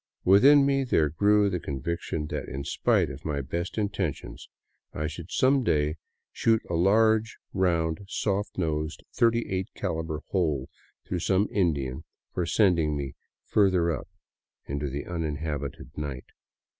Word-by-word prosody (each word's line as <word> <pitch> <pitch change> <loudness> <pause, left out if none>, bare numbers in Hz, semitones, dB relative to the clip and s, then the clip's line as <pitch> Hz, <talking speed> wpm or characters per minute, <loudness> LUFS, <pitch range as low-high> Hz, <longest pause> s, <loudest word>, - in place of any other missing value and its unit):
Within 135 +10 +7
me 135 -1 +2
there 80 - +2
grew 105 +4 +4
the 90 -3 -1
con 70 -3 -5
' - - -16
viction 85 -2 -2
that, - - -4
in 70 +1 -4
spite 70 - +1
of 65 +2 -10
my 75 -2 -2
best 85 +9 -4
intentions, 100 -7 -3 0.5
I 75 - -2
should 80 +3 -6
some 135 0 +3
day 75 -5 +1 0.3
shoot 115 -1 +2
a - - -4
large, 110 +5 +3 0.2
round, 85 -2 0
soft 100 0 -2
nosed, 80 -3 -2
38 115 -5 +1
caliber 80 -1 -3
hole 75 -8 0 0.3
through 90 - -2
some 95 +4 +2
Indian 75 -7 0 0.3
for 90 -2 -1
send 95 -3 +4
ing 75 -2 0
me 70 -1 -4 0.2
" - - -62
further 95 -5 +4
up 70 - -4 0.3
" - - -60
into 70 +1 -3
the 70 +2 -4
uninhabited 75 -5 -4
night. 70 -4 -5
85 Hz, 155 wpm, -27 LUFS, 75-100 Hz, 0.5 s, Within